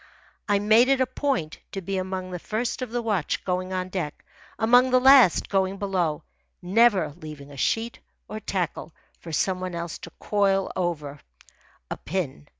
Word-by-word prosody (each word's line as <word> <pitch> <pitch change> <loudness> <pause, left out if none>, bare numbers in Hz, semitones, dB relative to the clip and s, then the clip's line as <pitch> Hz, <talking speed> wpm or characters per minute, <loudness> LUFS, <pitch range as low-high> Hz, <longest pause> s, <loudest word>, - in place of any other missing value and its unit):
I 205 - +4
made 215 +4 +5
it 270 -1 +3
a 260 - +3
point 255 - -2
to 195 - -3
be 195 +1 -2
among 185 0 -4
the 180 - -5
first 220 +8 -3
of 255 - -3
the 240 +1 -3
watch 205 -8 -1
going 185 0 -2
on 185 0 -3
deck, 175 -6 -5 0.3
among 245 +3 +5
the 255 0 +4
last 260 -7 +6
going 195 0 0
below, 180 -6 -1 0.4
never 190 -4 +3
leaving 150 -4 -10
a - - -11
sheet 225 - -1 0.3
or 215 - -6
tackle 175 -5 -3 0.2
for 165 - -9
some 185 +5 0
one 185 -1 -4
else 170 -1 -5
to - - -10
coil 195 -2 +1
over 150 -5 -3 0.7
a - - -3
pin. 150 - -4
190 Hz, 170 wpm, -25 LUFS, 170-220 Hz, 0.7 s, last